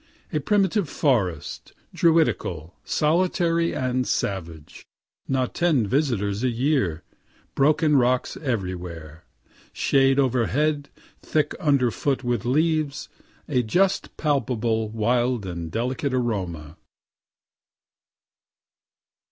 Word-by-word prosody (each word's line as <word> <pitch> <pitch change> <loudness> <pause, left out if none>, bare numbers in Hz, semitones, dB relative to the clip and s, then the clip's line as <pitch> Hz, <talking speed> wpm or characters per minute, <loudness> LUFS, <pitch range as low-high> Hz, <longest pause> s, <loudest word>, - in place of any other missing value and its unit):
A 155 - +1
primitive 200 +1 +1
forest, 100 - -1 0.2
druidical, 95 - +1
solitary 170 +1 +1
and 130 -1 -1
savage 85 -6 -4 0.4
not 130 -2 -1
ten 160 -10 +2
visitors 105 -4 0
a 130 - +2
year 120 - 0 0.5
broken 150 +2 +3
rocks 125 -1 +2
everywhere 90 - -5 0.5
shade 135 -1 +2
overhead, 140 +3 +1 0.3
thick 155 -1 0
underfoot 140 - +1
with 120 -1 -1
leaves 155 +1 0 0.4
a 125 - +1
just 185 - 0
palpable 120 -7 0
wild 120 +1 0
and 85 -3 -5
delicate 130 +3 -1
aroma. 90 - -3
125 Hz, 85 wpm, -24 LUFS, 105-150 Hz, 0.5 s, broken